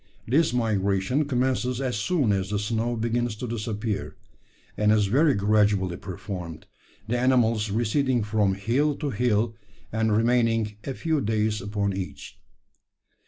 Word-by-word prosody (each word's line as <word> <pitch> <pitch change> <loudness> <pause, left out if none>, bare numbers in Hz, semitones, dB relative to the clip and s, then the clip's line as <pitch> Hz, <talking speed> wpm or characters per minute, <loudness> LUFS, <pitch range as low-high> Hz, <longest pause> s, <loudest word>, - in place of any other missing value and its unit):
This 150 +6 +3
migration 110 +3 +1
commences 125 -2 0
as 130 -4 -1
soon 125 - +1
as 95 -1 -1
the 105 - -1
snow 115 +3 -1
begins 115 0 -1
to 115 - -5
disappear; 110 -2 -3 0.6
and 105 0 +3
is 105 -1 +3
very 140 +9 +3
gradually 100 -3 +2
performed 90 -3 -7 0.4
the 120 +2 0
animals 115 -4 +2
receding 120 +3 +1
from 105 -2 +1
hill 130 +9 +1
to 145 -1 -3
hill, 115 -1 +1 0.4
and 110 0 +1
remaining 115 -2 +2
a 135 - -4
few 160 -3 0
days 110 -1 0
upon 100 0 -1
each. 75 -7 -7
110 Hz, 135 wpm, -25 LUFS, 105-125 Hz, 0.6 s, This